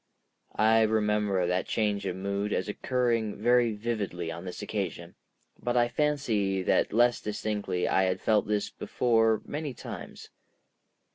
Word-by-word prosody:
I 110 +1 +4
remember 105 -3 +1
that 90 +1 0
change 105 -3 0
of 90 - -2
mood 100 +2 -2
as 95 - -1
occurring 115 -1 0
very 120 -2 +3
vividly 105 -6 -3
on 85 +2 -7
this 90 - -6
occasion, - - -4 0.5
but 120 0 0
I 120 0 +3
fancy 115 -9 0
that - - +2
less 120 +2 +3
distinctly 105 -3 -2
I 95 - +3
had 95 0 0
felt 105 -2 +2
this 105 -1 -1
before 115 -3 +1
many 145 -3 -4
times. - - -9
105 Hz, 140 wpm, -28 LUFS, 100-120 Hz, 0.5 s, I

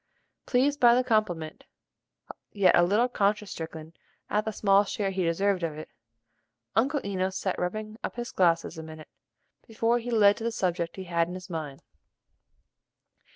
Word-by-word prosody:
Pleased 280 +3 +2
by 240 -1 +6
the 255 - +2
compliment, 195 -10 -1 0.9
yet 200 -3 +4
a - - +5
little 205 +8 +3
conscience 210 -3 0
stricken 160 0 -7 0.4
at 210 +1 +1
the 220 - -2
small 200 -1 +3
share 200 -1 -2
he 190 -1 -1
deserved 185 +3 +1
of 160 -3 -3
it, 155 - -8 0.9
Uncle 275 +5 +2
Enos 190 -1 -2
sat 190 - -2
rubbing 215 +5 -4
up - - -4
his 240 +1 -5
glasses 170 -6 +1
a - - -5
minute, 155 -1 -11 0.6
before 230 +2 +1
he 240 +1 -6
led 205 -3 +5
to 225 - -7
the 230 - -1
subject 175 -5 -2
he 190 - -6
had 170 -2 0
in 180 - -7
his 185 0 -9
mind. 150 -4 -6
195 Hz, 165 wpm, -27 LUFS, 170-225 Hz, 0.9 s, by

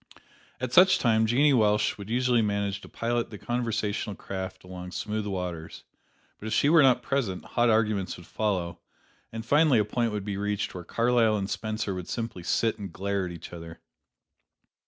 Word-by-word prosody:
At 125 -1 -4
such 185 +3 +7
times 110 -5 +2
Jeannie 140 +5 +4
Welsh 105 -3 +2
would 100 +1 -8
usually 125 0 +2
manage 100 -2 -1
to - - -12
pilot 120 0 -1
the 105 - -8
conversational 110 -3 -2
craft 95 -1 -6
along 90 0 -8
smooth 105 0 -3
waters; 90 -4 -5 0.6
but 110 - -7
if 110 - -2
she 140 - +3
were 165 0 +7
not 130 -3 +4
present, 120 -10 -2
hot 120 0 +1
arguments 110 -4 +1
would 90 - -13
follow, 90 -6 -2 0.5
and 115 0 -6
finally 145 +1 +4
a 105 - +3
point 115 +2 -1
would 105 -2 -4
be 100 -2 -3
reached 105 0 -2
where 90 - -7
Carlyle 115 +2 +2
and 100 -1 -3
Spencer 110 -2 -2
would 90 -2 -6
simply 115 -5 -4
sit 110 +6 0
and 100 -3 -6
glare 100 +1 -2
at - - -6
each 85 0 -10
other. 85 -1 -9
105 Hz, 180 wpm, -27 LUFS, 95-115 Hz, 0.6 s, such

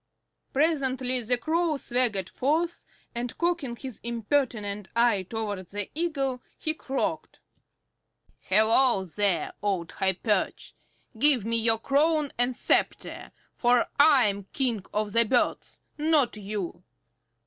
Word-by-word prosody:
Presently 265 -4 0
the 245 +2 +1
Crow 320 +4 0
swaggered 240 -8 0
forth, 325 - -1 0.3
and 240 0 -4
cocking 340 -8 -1
his 260 -1 -8
impertinent 230 -4 -2
eye 235 -4 +3
towards 205 -5 -5
the 205 -1 -4
Eagle 275 -6 -2 0.2
he 310 - -1
croaked, 315 +2 -4 1.0
"Hello 220 +1 +3
there, 185 -2 0
Old 190 -5 -2
High 190 0 0
perch! 210 +3 -1 0.5
Give 270 -6 +6
me 230 +1 +2
your 225 0 +3
crown 290 +4 +1
and 245 +1 +2
sceptre, - - -1 0.2
for 245 0 +3
I 285 -4 +6
am 200 -1 -2
King 240 -7 0
of 210 0 -2
the 230 - +6
Birds, 240 +2 -1 0.2
not 300 -6 +2
you. 195 -4 -5
240 Hz, 120 wpm, -27 LUFS, 210-280 Hz, 1.0 s, Give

